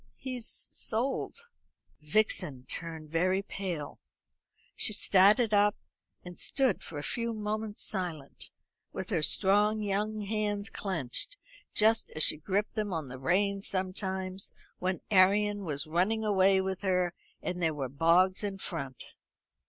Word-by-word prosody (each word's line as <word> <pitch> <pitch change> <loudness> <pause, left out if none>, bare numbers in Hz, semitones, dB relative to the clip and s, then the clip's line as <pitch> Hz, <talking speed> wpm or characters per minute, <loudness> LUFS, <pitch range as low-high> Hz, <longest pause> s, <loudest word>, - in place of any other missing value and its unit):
He's 250 -3 -3 0.3
sold." 270 - -2 0.5
Vixen 150 -6 0
turned 160 +1 -6
very 185 +4 +2
pale. 175 -8 -5 0.8
She 215 - +3
started 210 +3 +4
up, 205 0 +4 0.5
and 180 -1 -9
stood 270 -2 +1
for 160 - -8
a 145 - -4
few 230 +5 -2
moments 215 0 -3
silent, 170 -8 -4 0.4
with 190 - -5
her 170 -5 +1
strong 205 +6 +3
young 210 +1 -1
hands 205 0 -2
clenched, 185 - -2 0.4
just 220 +1 +4
as 155 - +4
she - - +4
gripped 195 +7 -1
them 215 -3 -2
on 160 -4 -2
the 130 +1 -8
reins 195 +7 +1
sometimes 190 0 -2 0.3
when 185 0 -1
Arion 205 +1 +4
was 145 -2 -1
running 190 +8 +1
away 195 -2 +4
with 190 -1 -3
her 180 -3 +1 0.3
and 180 0 -3
there 160 -2 +1
were 135 -3 -2
bogs 170 - +3
in 200 -1 -2
front. 140 -9 -6
190 Hz, 135 wpm, -30 LUFS, 170-210 Hz, 0.8 s, started